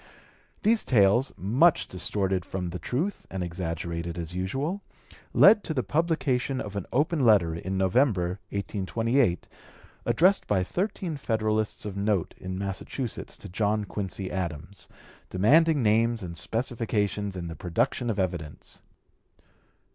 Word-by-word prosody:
These 225 Hz, +1 st, +3 dB
tales, 115 Hz, +2 st, +4 dB
much 130 Hz, -, +3 dB
distorted 95 Hz, 0 st, -1 dB
from 90 Hz, -1 st, -4 dB
the 90 Hz, -, -5 dB
truth 150 Hz, -, -3 dB
and 95 Hz, -1 st, -3 dB
exaggerated 85 Hz, -1 st, -4 dB
as 85 Hz, 0 st, -4 dB
usual, 135 Hz, -, -2 dB, 0.5 s
led 210 Hz, 0 st, +7 dB
to 160 Hz, -, -3 dB
the 130 Hz, -, +1 dB
publication 140 Hz, -5 st, 0 dB
of 100 Hz, -4 st, -6 dB
an 100 Hz, -, -4 dB
open 150 Hz, +4 st, +1 dB
letter, 105 Hz, -10 st, +4 dB
in 95 Hz, +4 st, -3 dB
November, 95 Hz, -2 st, +2 dB
1828, 105 Hz, +1 st, 0 dB, 0.6 s
addressed 190 Hz, +4 st, +3 dB
by 95 Hz, -3 st, +2 dB
thirteen 180 Hz, -, -2 dB
Federalists 110 Hz, -5 st, -1 dB
of 100 Hz, -2 st, -5 dB
note 100 Hz, -3 st, 0 dB
in 95 Hz, 0 st, -5 dB
Massachusetts 100 Hz, +5 st, -5 dB
to -, -, -9 dB
John 105 Hz, +2 st, 0 dB
Quincy 95 Hz, -2 st, -5 dB
Adams, 90 Hz, +1 st, -5 dB, 0.4 s
demanding 145 Hz, -, +4 dB
names 115 Hz, +1 st, +2 dB
and 85 Hz, -2 st, -6 dB
specifications 105 Hz, -3 st, -1 dB
and 85 Hz, -2 st, -5 dB
the 80 Hz, -, -6 dB
production 90 Hz, +8 st, -1 dB
of 110 Hz, -, -1 dB
evidence. 85 Hz, -6 st, -4 dB
105 Hz, 130 wpm, -27 LUFS, 90-130 Hz, 0.6 s, led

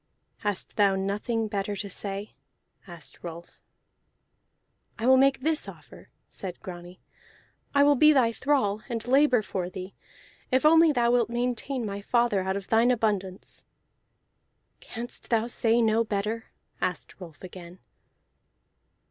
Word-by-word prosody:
"Hast 205 Hz, -3 st, -3 dB
thou 200 Hz, -2 st, +4 dB
nothing 210 Hz, +4 st, -1 dB
better 205 Hz, -1 st, -3 dB
to 200 Hz, -, -4 dB
say?" 200 Hz, +1 st, -5 dB, 0.5 s
asked 170 Hz, -4 st, -9 dB
Rolf. 170 Hz, 0 st, -9 dB, 1.4 s
"I 225 Hz, -, -3 dB
will 260 Hz, +1 st, +7 dB
make 270 Hz, 0 st, +3 dB
this 315 Hz, +2 st, +1 dB
offer," -, -, -14 dB, 0.2 s
said 185 Hz, -3 st, -7 dB
Grani. 175 Hz, 0 st, -10 dB, 0.8 s
"I 280 Hz, -, +6 dB
will 290 Hz, 0 st, +6 dB
be 305 Hz, +3 st, +6 dB
thy 255 Hz, -6 st, +3 dB
thrall, 230 Hz, -5 st, 0 dB
and 230 Hz, -2 st, -3 dB
labor 260 Hz, -3 st, +4 dB
for 185 Hz, -3 st, -3 dB
thee, 185 Hz, +1 st, -8 dB, 0.6 s
if 260 Hz, +3 st, +2 dB
only 325 Hz, +1 st, +7 dB
thou 240 Hz, -4 st, +2 dB
wilt 240 Hz, -2 st, +2 dB
maintain 245 Hz, +1 st, -2 dB
my 200 Hz, -1 st, -5 dB
father 235 Hz, -2 st, +1 dB
out 190 Hz, +1 st, -1 dB
of 200 Hz, -, -8 dB
thine 230 Hz, +2 st, +4 dB
abundance." 205 Hz, -6 st, -1 dB, 1.2 s
"Canst 240 Hz, +1 st, -5 dB
thou 230 Hz, -1 st, +2 dB
say 235 Hz, 0 st, +2 dB
no 220 Hz, +1 st, +3 dB
better?" 215 Hz, +1 st, -3 dB, 0.4 s
asked 180 Hz, +2 st, -4 dB
Rolf 165 Hz, -2 st, -11 dB
again. 180 Hz, -1 st, -10 dB
220 Hz, 135 wpm, -27 LUFS, 195-245 Hz, 1.4 s, will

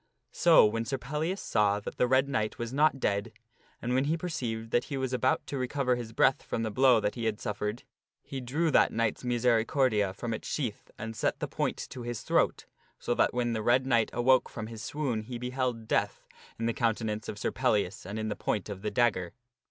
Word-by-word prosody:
So -, -, +6 dB
when 115 Hz, +2 st, 0 dB
Sir 135 Hz, +4 st, -2 dB
Pellias 150 Hz, +9 st, -2 dB
saw 105 Hz, -1 st, +2 dB
that -, -, -7 dB
the 125 Hz, -, +3 dB
Red 130 Hz, +2 st, +3 dB
Knight 110 Hz, -6 st, -1 dB
was 120 Hz, +1 st, -4 dB
not 145 Hz, -1 st, +3 dB
dead, 100 Hz, -4 st, 0 dB, 0.5 s
and 120 Hz, +1 st, -2 dB
when 130 Hz, +2 st, +2 dB
he 160 Hz, +3 st, +1 dB
perceived 115 Hz, -10 st, -4 dB
that 120 Hz, -, +2 dB
he 140 Hz, -, -4 dB
was 130 Hz, -1 st, -2 dB
about 130 Hz, +1 st, +1 dB
to 140 Hz, -, -4 dB
recover 130 Hz, 0 st, 0 dB
his 120 Hz, -2 st, -6 dB
breath 130 Hz, +4 st, +3 dB
from 115 Hz, -, -3 dB
the 110 Hz, -, -2 dB
blow 130 Hz, 0 st, +5 dB
that 105 Hz, -, -1 dB
he 115 Hz, -2 st, -4 dB
had 110 Hz, -2 st, -1 dB
suffered, 105 Hz, +2 st, -3 dB, 0.4 s
he 135 Hz, -1 st, -6 dB
drew 150 Hz, +7 st, 0 dB
that -, -, +4 dB
knight's 115 Hz, +1 st, -1 dB
misericordia 120 Hz, -3 st, +2 dB
from 115 Hz, +4 st, -4 dB
its 110 Hz, -, -5 dB
sheath 120 Hz, -8 st, -3 dB
and 115 Hz, +1 st, -6 dB
set -, -, -1 dB
the -, -, -2 dB
point -, -, -2 dB
to 125 Hz, -, -7 dB
his 120 Hz, -1 st, -5 dB
throat, -, -, +1 dB, 0.3 s
so -, -, -1 dB
that -, -, +3 dB
when 120 Hz, -1 st, 0 dB
the 110 Hz, -, -1 dB
Red 125 Hz, +4 st, +3 dB
Knight 120 Hz, -4 st, +2 dB
awoke 125 Hz, +2 st, +3 dB
from 110 Hz, -, -6 dB
his 110 Hz, -1 st, -8 dB
swoon 135 Hz, -7 st, -2 dB
he 120 Hz, +3 st, -6 dB
beheld 125 Hz, -2 st, -2 dB
death, -, -, -1 dB, 0.3 s
in 115 Hz, -, -2 dB
the 115 Hz, -, +1 dB
countenance 110 Hz, -2 st, -1 dB
of -, -, -5 dB
Sir -, -, -1 dB
Pellias 105 Hz, -7 st, 0 dB
and 100 Hz, +4 st, -6 dB
in 110 Hz, 0 st, -2 dB
the 105 Hz, -, -2 dB
point 105 Hz, 0 st, -2 dB
of 100 Hz, -2 st, -6 dB
the 105 Hz, -, -1 dB
dagger. 100 Hz, -6 st, +1 dB
120 Hz, 220 wpm, -29 LUFS, 110-130 Hz, 0.5 s, So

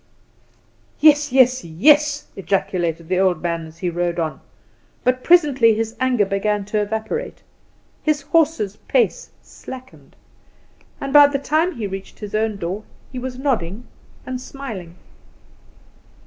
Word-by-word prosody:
"Yes, 295 Hz, -2 st, +5 dB
yes, 255 Hz, 0 st, +4 dB
yes," 290 Hz, -, +3 dB
ejaculated 175 Hz, -4 st, -2 dB
the 185 Hz, +1 st, 0 dB
old 185 Hz, -3 st, +2 dB
man 170 Hz, -1 st, -2 dB
as 160 Hz, +1 st, -15 dB
he 180 Hz, +1 st, -2 dB
rode 175 Hz, 0 st, -2 dB
on; 160 Hz, -2 st, -3 dB, 0.6 s
but, 255 Hz, 0 st, +1 dB
presently, 280 Hz, -10 st, +5 dB
his 225 Hz, +1 st, -3 dB
anger 255 Hz, -5 st, +2 dB
began 200 Hz, +1 st, -1 dB
to 210 Hz, +1 st, -1 dB
evaporate, 220 Hz, -, -4 dB, 0.6 s
his 300 Hz, -2 st, 0 dB
horse's 295 Hz, -, +1 dB
pace -, -, +1 dB
slackened, 260 Hz, 0 st, -12 dB, 0.8 s
and 275 Hz, 0 st, -4 dB
by 290 Hz, -1 st, +9 dB
the 285 Hz, -1 st, -1 dB
time 315 Hz, +6 st, 0 dB
he 235 Hz, -, -6 dB
had 200 Hz, -, -3 dB
reached 195 Hz, 0 st, -8 dB
his 210 Hz, -2 st, -8 dB
own 215 Hz, -1 st, 0 dB
door 190 Hz, +3 st, -4 dB, 0.3 s
he 255 Hz, -, -5 dB
was 250 Hz, 0 st, -5 dB
nodding 240 Hz, -6 st, -2 dB, 0.4 s
and 255 Hz, -1 st, -5 dB
smiling. 215 Hz, -12 st, -8 dB
225 Hz, 135 wpm, -21 LUFS, 190-280 Hz, 0.8 s, by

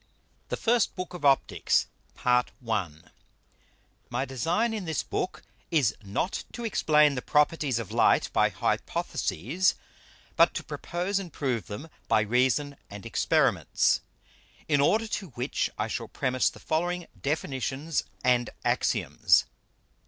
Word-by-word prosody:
THE -, -, -2 dB
FIRST 235 Hz, -1 st, +2 dB
BOOK 180 Hz, -1 st, -5 dB
OF 180 Hz, -, -8 dB
OPTICKS 135 Hz, -1 st, +3 dB, 0.3 s
PART 125 Hz, 0 st, +2 dB, 0.2 s
I. 105 Hz, -6 st, 0 dB, 1.2 s
My 125 Hz, +3 st, -1 dB
Design 165 Hz, -, 0 dB
in 210 Hz, -4 st, -4 dB
this 160 Hz, -2 st, -1 dB
Book 185 Hz, -, -3 dB, 0.3 s
is 145 Hz, -, +3 dB
not 105 Hz, -, -2 dB
to 240 Hz, -, -5 dB
explain 150 Hz, -8 st, +4 dB
the 125 Hz, -, -3 dB
Properties 150 Hz, -3 st, +2 dB
of 115 Hz, -5 st, -5 dB
Light -, -, +4 dB
by -, -, +4 dB
Hypotheses, 155 Hz, -, 0 dB, 0.6 s
but -, -, +5 dB
to -, -, -3 dB
propose 185 Hz, +3 st, -2 dB
and 180 Hz, -4 st, -7 dB
prove 125 Hz, -, -2 dB
them 105 Hz, +10 st, -7 dB, 0.2 s
by 110 Hz, -, +4 dB
Reason 130 Hz, +6 st, +1 dB
and 100 Hz, -1 st, -9 dB
Experiments: -, -, +2 dB, 0.7 s
In 145 Hz, -2 st, +3 dB
order 220 Hz, +10 st, +3 dB
to 205 Hz, -2 st, -3 dB
which 120 Hz, -, -1 dB
I -, -, -1 dB
shall -, -, -4 dB
premise 130 Hz, -1 st, +1 dB
the -, -, -14 dB
following 175 Hz, +2 st, -1 dB, 0.2 s
Definitions 140 Hz, 0 st, -2 dB, 0.2 s
and 125 Hz, -1 st, +3 dB, 0.2 s
Axioms. -, -, +2 dB
145 Hz, 130 wpm, -28 LUFS, 125-175 Hz, 1.2 s, but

